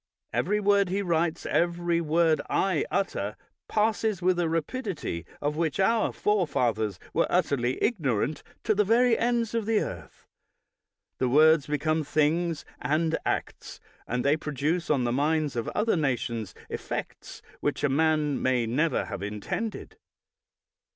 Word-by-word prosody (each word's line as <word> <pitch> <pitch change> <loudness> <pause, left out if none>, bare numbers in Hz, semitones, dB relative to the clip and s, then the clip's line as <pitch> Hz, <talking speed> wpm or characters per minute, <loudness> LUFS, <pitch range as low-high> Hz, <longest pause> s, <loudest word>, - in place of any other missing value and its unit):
Every 210 - +1
word 200 -2 +3
he 200 +2 -1
writes, 170 -2 0
every 175 0 +1
word 160 0 +2
I 185 -6 +1
utter, 130 - -1 0.3
passes 215 -2 +1
with 180 0 +2
a 170 -2 +1
rapidity 165 - -3
of 145 +1 -1
which 160 -1 -1
our 225 +3 +2
forefathers 120 - 0 0.2
were - - +2
utterly 125 -2 +1
ignorant, 150 - 0 0.2
to 215 - +2
the 210 0 +3
very 230 +3 +4
ends 235 -1 0
of 225 -2 -1
the 225 -2 +3
earth; - - -7 0.9
the 130 - +1
words 155 +2 +5
become 155 +2 0
things 155 +2 0 0.2
and 160 +2 +1
acts, - - -3 0.3
and 125 +2 -2
they 145 +2 +4
produce 155 +3 -2
on 140 -4 +2
the 120 - 0
minds 150 +2 +1
of 115 -2 -2
other 220 0 +2
nations 120 - -2
effects - - -6 0.2
which - - -2
a - - +4
man 155 0 +1
may 125 -2 +2
never 150 +8 0
have - - -6
intended. 105 - -4
160 Hz, 140 wpm, -27 LUFS, 140-195 Hz, 0.9 s, words